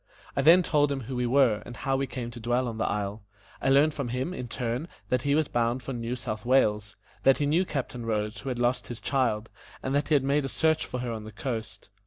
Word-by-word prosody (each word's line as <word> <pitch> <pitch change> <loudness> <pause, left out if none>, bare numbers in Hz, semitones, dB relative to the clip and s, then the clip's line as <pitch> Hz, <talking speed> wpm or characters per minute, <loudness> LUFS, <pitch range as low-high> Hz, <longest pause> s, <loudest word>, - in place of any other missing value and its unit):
I - - +2
then 170 +6 +7
told 145 -3 +2
him 135 -1 -2
who 130 +2 -6
we 125 0 0
were, 120 -5 +4
and 120 +2 -9
how 135 0 0
we 135 0 0
came 120 -2 -5
to 120 - -9
dwell 120 +2 0
on 115 -1 -5
the - - +1
isle. 100 +1 -2 0.4
I - - +1
learned 145 +3 +5
from 140 -4 -3
him, 125 +8 -2
in 125 -9 -5
turn, 120 +5 -3 0.2
that 125 -1 +2
he 140 +2 +2
was 155 -1 +2
bound 120 +1 0
for 135 - -4
New 120 0 -3
South 110 -3 -5
Wales; 105 -5 +2 0.3
that 135 - +5
he 145 - 0
knew 165 +6 +2
Captain 125 -6 -4
Rose, 105 -1 -2
who 120 - -5
had 125 - -2
lost 120 +1 0
his 120 -2 -6
child, 115 -5 0 0.3
and 130 - -1
that 145 +1 +1
he 155 - +3
had 140 - +3
made 140 +2 +2
a - - -1
search 160 +1 +1
for 125 - -4
her 125 -1 -3
on 110 -2 -5
the 110 - -9
coast. 110 -3 -5
125 Hz, 260 wpm, -28 LUFS, 115-140 Hz, 0.4 s, then